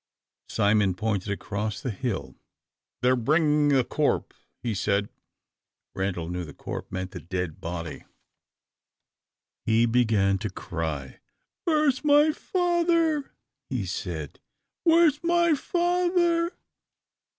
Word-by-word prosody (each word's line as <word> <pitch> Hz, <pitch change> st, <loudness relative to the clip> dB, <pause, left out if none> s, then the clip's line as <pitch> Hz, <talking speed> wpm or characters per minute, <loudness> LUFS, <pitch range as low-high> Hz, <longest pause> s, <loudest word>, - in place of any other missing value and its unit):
Simon 100 Hz, -2 st, +2 dB
pointed 100 Hz, -1 st, -1 dB
across 105 Hz, +1 st, -3 dB
the 125 Hz, -, -3 dB
hill. 110 Hz, 0 st, -3 dB, 0.7 s
"They 125 Hz, -, +5 dB
are 130 Hz, -, +5 dB
bringing 150 Hz, +4 st, +3 dB
the 135 Hz, -3 st, +4 dB
corp," -, -, 0 dB, 0.3 s
he 120 Hz, -2 st, -1 dB
said. 100 Hz, +1 st, 0 dB, 0.8 s
Randal 95 Hz, -3 st, -2 dB
knew 90 Hz, +1 st, -3 dB
the 75 Hz, -4 st, -10 dB
"corp" -, -, -6 dB
meant 95 Hz, 0 st, -4 dB
the 90 Hz, -, -7 dB
dead 90 Hz, -2 st, -4 dB
body. 85 Hz, -2 st, -5 dB, 1.6 s
He 115 Hz, +1 st, +3 dB
began 110 Hz, -5 st, +2 dB
to 105 Hz, -, -3 dB
cry. 80 Hz, -7 st, -5 dB, 0.5 s
"Where 310 Hz, -2 st, +3 dB
is 265 Hz, 0 st, +1 dB
my 295 Hz, +1 st, +5 dB
father?" 335 Hz, -4 st, +1 dB, 0.4 s
he -, -, -2 dB
said, -, -, -5 dB, 0.5 s
"where 335 Hz, 0 st, +6 dB
is 295 Hz, -2 st, +2 dB
my 340 Hz, -1 st, +3 dB
father?" 345 Hz, +1 st, +1 dB
120 Hz, 115 wpm, -26 LUFS, -, 1.6 s, where